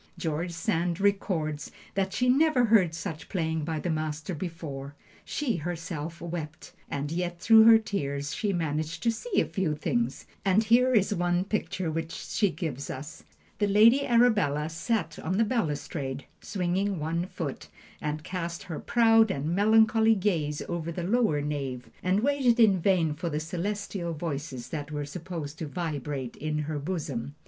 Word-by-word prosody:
George 165 +2 -2
Sand 170 -1 -1
records 175 -7 0 0.2
that 195 -1 0
she 250 +5 0
never 270 -1 +4
heard 195 -8 +4
such 165 -3 -6
playing 160 -3 -1
by 160 0 -2
the 175 - -2
Master 155 +2 -3
before; 145 -5 -6 0.3
she 255 -10 -1
herself 170 -1 -5
wept, 165 -3 -6 0.2
and 145 +1 -3
yet 175 0 -2
through 220 +2 +7
her 225 0 +9
tears 145 -10 -3
she 210 - -1
managed 160 -1 -2
to 230 - +3
see 380 - -1
a - - +2
few 180 -6 -1
things, 235 +10 -1 0.2
and 195 +2 +3
here 245 +3 +4
is 205 -1 +3
one 175 -1 +1
picture 190 -4 -2
which 160 +1 -3
she 205 - 0
gives 150 -5 -4
us: 145 +5 -7 0.4
"The 205 - +2
Lady 225 +7 +6
Arabella 210 - +3
sat 165 +1 -2
on 185 +4 -2
the 225 - +4
balustrade, 150 - -2 0.2
swinging 190 0 -1
one 165 +3 -1
foot, 155 -7 -5 0.3
and 150 0 -3
cast 170 -1 -4
her 160 -4 -5
proud 225 -2 +4
and 155 0 -1
melancholy 220 +2 +5
gaze 165 -7 0
over 170 -1 -3
the 175 +1 -4
lower 195 -6 +2
nave, 140 -4 -4
and 185 +3 +2
waited 260 -3 +2
in 200 -6 +5
vain 170 -5 +3
for 170 +3 -3
the 150 -1 -1
celestial 180 +1 -3
voices 145 -6 -5
that 145 -2 -4
were 145 -1 -3
supposed 155 -1 -6
to 160 - -3
vibrate 145 -6 -4
in 155 0 -2
her 150 -1 -3
bosom. 145 -5 -4
170 Hz, 160 wpm, -28 LUFS, 150-205 Hz, 0.4 s, her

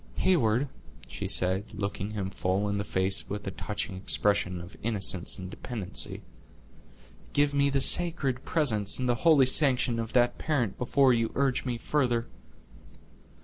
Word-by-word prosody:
"Heyward," 135 -7 +2 0.4
she - - -5
said, 95 +2 0
looking 100 0 -4
him 100 -3 -4
full 95 +2 -1
in 100 0 -1
the - - -1
face 95 -1 0
with 105 0 -5
a 95 - -3
touching 100 0 -4
expression 100 -1 0
of 90 +3 -11
innocence 100 -5 0
and 95 - -7
dependency, 105 0 -4 1.1
"give 145 0 +2
me 140 0 +3
the 135 -1 0
sacred 140 -6 +2
presence 110 -11 +2
and 130 - -2
the 120 - +3
holy 155 -6 +5
sanction 130 -3 +2
of 115 0 -4
that 120 -1 +2
parent 125 -10 -1
before 130 +1 +3
you 115 -1 0
urge 135 -2 0
me 125 -2 -2
further." 120 -2 0
115 Hz, 150 wpm, -28 LUFS, 100-135 Hz, 1.1 s, holy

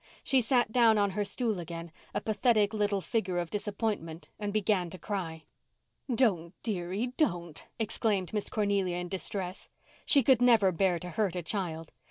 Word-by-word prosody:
She 265 -2 +3
sat 240 -1 +2
down 230 -2 +5
on 200 -1 +2
her 205 +2 -1
stool 215 0 -1
again, 170 0 -7 0.2
a - - -2
pathetic 215 -1 +2
little 205 -2 0
figure 190 -4 -1
of 175 -1 -2
disappointment, 205 -6 -3
and 205 -1 -2
began 200 -4 +1
to 185 - -8
cry. 175 -6 -4 0.7
"Don't—dearie—don't," 190 - -1
exclaimed 215 -4 -1
Miss 210 -1 0
Cornelia 200 -4 0
in 180 0 -4
distress. 190 0 -4 0.4
She 280 -3 +6
could 255 -1 +4
never 230 -6 +5
bear 180 0 +2
to 180 +1 -7
hurt 195 0 0
a 175 - -3
child. 165 -4 -3
200 Hz, 155 wpm, -30 LUFS, 175-220 Hz, 0.7 s, She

